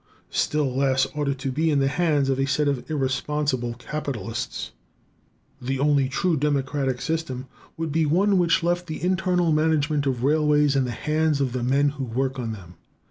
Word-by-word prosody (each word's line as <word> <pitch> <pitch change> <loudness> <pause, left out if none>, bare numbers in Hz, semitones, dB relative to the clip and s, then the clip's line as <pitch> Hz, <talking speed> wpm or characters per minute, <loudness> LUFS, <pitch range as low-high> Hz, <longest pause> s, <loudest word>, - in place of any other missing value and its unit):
Still 145 -4 0
less 135 -1 +2
ought 150 -1 -2
it 140 0 0
to 135 0 -3
be 160 +5 +1
in 145 - +2
the 135 -1 +2
hands 150 -2 +1
of 135 -1 0
a 135 - +1
set 150 +2 +1
of 140 -1 -2
irresponsible 135 -3 -1
capitalists. 120 -5 -5 0.9
The 135 +2 -2
only 140 -1 +2
truly 165 +4 +1
democratic 140 -2 0
system 150 -5 -3 0.3
would 165 -1 -3
be 160 +1 +1
one 190 +5 +3
which 175 0 +2
left 175 +1 0
the 155 0 -6
internal 180 -2 +1
management 155 -2 +1
of 125 -2 -1
railways 150 0 +3
in 135 -1 +2
the - - -4
hands 150 +5 0
of 130 -3 0
the 130 - -2
men 135 +4 +2
who 140 -1 -5
work 130 +2 -2
on 115 -2 -3
them. 90 -5 -10
145 Hz, 185 wpm, -24 LUFS, 130-155 Hz, 0.9 s, one